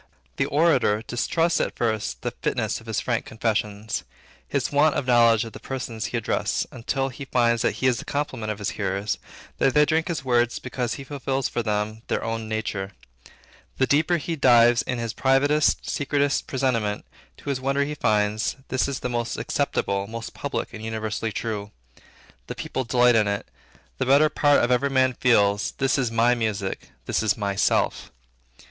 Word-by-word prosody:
The - - +1
orator 140 -8 +2
distrusts 165 +8 0
at - - -2
first 110 - -2
the - - -1
fitness - - -1
of - - -17
his - - -1
frank - - -1
confessions, 110 -1 -2 0.4
his - - -1
want 145 +1 +4
of 140 - -1
knowledge 115 -2 +4
of 115 - -9
the - - -9
persons 125 -4 -5
he - - -2
addresses, - - -1
until 135 +3 -2
he 135 +2 -8
finds 120 -3 +2
that - - +1
he - - -3
is 125 -3 +3
the - - -8
complement 130 -7 -2
of 105 - -4
his 100 0 -3
hearers; 100 +1 -2 0.4
that 135 - +2
they 150 0 +6
drink 160 +1 +1
his 160 -5 -3
words 120 -1 +2
because 125 -2 -3
he 135 - -8
fulfill 135 -1 -3
for 120 - -1
them 105 0 -2
their - - -1
own 115 -1 -3
nature; 105 -3 -3 0.8
the 130 - +3
deeper 155 +6 +2
he 165 +1 -3
dives 120 -4 +5
into 120 -2 -3
his 115 -1 -3
privatest, 145 +3 +2
secretest 140 0 0
presentiment, 115 -6 -1 0.3
to - - -8
his 130 -2 -3
wonder 135 +2 +1
he 150 +2 -3
finds, 105 -4 +1
this 130 - +1
is 140 -2 -4
the - - -1
most 120 -1 -2
acceptable, 100 0 -1
most 115 +1 -7
public, - - -4
and 110 - -8
universally 110 0 -3
true. 105 -2 -4 0.8
The - - -5
people 130 - -3
delight 125 0 +4
in 110 -2 +3
it; 100 0 -2 0.5
the 130 - 0
better 145 +3 +5
part 145 -2 +3
of 120 - +1
every 135 +3 +2
man 130 -1 +3
feels, 105 -5 +2
This 135 -1 +1
is 125 -3 +1
my 115 +2 +3
music; 105 -5 -3 0.2
this - - 0
is 105 -2 +1
myself. 100 -2 0
120 Hz, 180 wpm, -24 LUFS, 110-135 Hz, 0.8 s, they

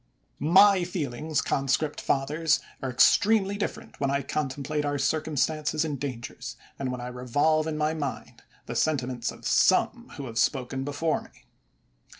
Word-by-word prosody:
My 195 +1 +7
feelings, 155 -3 -2
conscript 140 +2 0
fathers, 150 +3 +1 0.2
are 135 - -2
extremely 200 - +4
different 205 - -5
when 140 - +1
I 140 0 0
contemplate 145 +1 -2
our 145 0 -1
circumstanoes 155 +1 0
and 145 -4 -3
dangers, 125 -4 -6 0.2
and 135 -2 -2
when 125 - -4
I 120 - -5
revolve 145 +6 +1
in 155 -1 -2
my 155 +1 +1
mind 145 -4 -5 0.2
the - - -6
sentiments 130 -5 0
of - - -13
some - - +3
who 140 - -5
have 115 -2 -3
spoken 135 -1 0
before 145 +3 -1
me. - - -19
145 Hz, 150 wpm, -27 LUFS, 135-155 Hz, 0.2 s, My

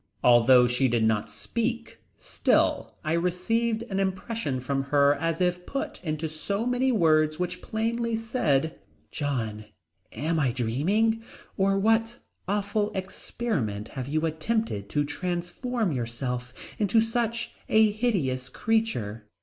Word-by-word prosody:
Although 125 +1 +7
she 125 +2 +2
did 115 -2 +1
not 110 -1 +1
speak 235 - -3 0.2
still - - +1
I 155 0 0
received 220 +7 0
an 195 -5 -3
impression 190 - -2
from 135 +2 -2
her 140 0 +4
as 165 +3 -2
if 180 -1 +1
put 275 -8 -4
into 155 -1 -2
so 200 +8 -3
many 250 +1 +2
words 155 -7 +3
which 180 +1 -3
plainly 230 +1 -1
said: 165 - 0 0.3
"John, 115 -8 -3 0.5
am 160 +7 -1
I 130 -5 +1
dreaming 180 - +1 0.3
or 195 0 +2
what 225 +3 +2 0.3
awful 205 +1 0
experiment 185 - -3
have 130 -1 -5
you 155 +3 0
attempted 160 - -1
to 145 -1 +1
transform 180 - -2
yourself 125 0 -3 0.3
into 210 +1 +3
such 230 0 0 0.2
a 220 -1 +5
hideous 165 - -1
creature?" 125 - -1
175 Hz, 125 wpm, -27 LUFS, 135-225 Hz, 0.5 s, Although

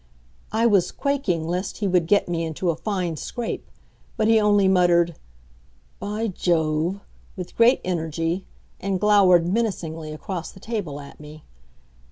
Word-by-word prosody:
I 225 +2 +1
was 195 -6 +3
quaking 215 - -1
lest 180 +3 -3
he 205 - -1
would 180 -3 +2
get 205 +3 +3
me 170 -1 -1
into 165 +2 -1
a - - -4
fine 180 -6 -2
scrape, 240 - -5 0.5
but 215 - +2
he 225 0 +5
only 205 -2 +4
muttered, 175 -2 +4 0.9
"By 210 +3 -3
Jove!" 170 0 0 0.3
with 180 -2 -7
great 235 +3 +5
energy, 165 0 -2 0.3
and 195 -1 -1
glowered 190 -4 +5
menacingly 175 -6 -2
across 175 +2 -5
the - - -15
table 195 -10 -4
at 140 -1 -12
me. 150 +1 -12
180 Hz, 145 wpm, -23 LUFS, 165-205 Hz, 0.9 s, he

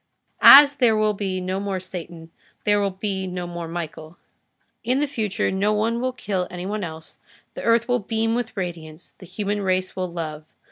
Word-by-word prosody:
As 285 +1 +9
there 230 -5 +3
will 215 0 +2
be 195 -2 -3
no 185 +1 -3
more 200 -1 -3
Satan, 170 -3 -9 0.3
there 205 0 +2
will 200 - +1
be 190 0 -4
no 180 -1 -4
more 175 -1 -6
Michael. 165 -1 -7 0.7
In 250 +3 +1
the 295 - +2
future 225 -9 -2
no 200 +3 +1
one 225 +3 0
will 255 0 0
kill 195 -7 -3
any 180 0 -6
one 210 +1 -3
else, 160 -1 -9 0.3
the - - -7
earth 230 0 +2
will 245 0 +1
beam 225 +1 -1
with 240 -2 -3
radiance, 165 -3 -6
the 185 - -12
human 205 +2 -3
race 185 -1 -1
will 185 -2 -3
love. 155 -3 -5
190 Hz, 190 wpm, -23 LUFS, 175-220 Hz, 0.7 s, As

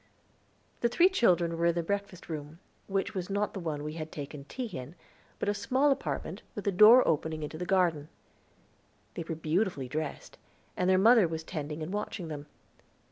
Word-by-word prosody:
The 235 - +2
three 350 +9 +5
children 175 - +2
were 170 - +3
in 170 - +2
the 170 - 0
breakfast 200 0 -4
room, 155 -1 -6 0.3
which 195 +1 -1
was 185 -2 -4
not 200 +1 -1
the 195 - -5
one 155 -4 -3
we 150 0 -4
had 160 -1 -6
taken 145 -1 -7
tea 255 - -5
in, 130 +6 -7 0.4
but - - -3
a 205 - +2
small 260 +8 +2
apartment, 165 - -3
with 205 - -6
a 200 - +2
door 215 +7 +8
opening 155 0 0
into 155 +1 -6
the 180 - -4
garden. 170 -6 +2 1.0
They - - -5
were 165 0 -4
beautifully 160 -3 -1
dressed, 150 +3 -5 0.4
and 180 0 +1
their 185 - +5
mother 220 0 +6
was 160 0 -4
tending 155 -2 -5
and 170 +5 -5
watching 200 -5 -4
them. 145 -1 -6
170 Hz, 190 wpm, -30 LUFS, 155-200 Hz, 1.0 s, door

